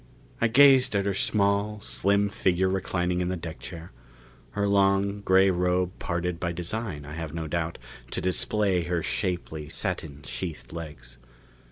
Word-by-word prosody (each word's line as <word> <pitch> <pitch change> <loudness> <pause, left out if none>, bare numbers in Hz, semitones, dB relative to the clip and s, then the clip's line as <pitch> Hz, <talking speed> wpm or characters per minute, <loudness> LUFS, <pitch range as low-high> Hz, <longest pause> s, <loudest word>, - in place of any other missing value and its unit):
I 115 - +5
gazed 130 -1 +6
at 100 -1 +1
her 100 - +1
small, 100 +1 +1
slim 100 0 +1
figure 95 -1 +1
reclining 90 -1 0
in 90 - 0
the 90 - -1
deck 80 -1 -7
chair. 85 0 -9 0.6
Her 100 0 0
long, 100 0 +2
gray 95 0 +5
robe 90 0 +1
parted 85 0 -2
by 85 -1 -2
design, 90 -3 -4
I 75 - -8
have 80 -1 -5
no 80 -1 -3
doubt, 85 +1 -2 0.3
to - - -2
display 95 0 +1
her 85 -2 -1
shapely, 75 +3 -3
satin 75 -2 -4
sheathed 80 -8 -6
legs. 75 -7 -9
90 Hz, 155 wpm, -27 LUFS, 85-100 Hz, 0.6 s, gazed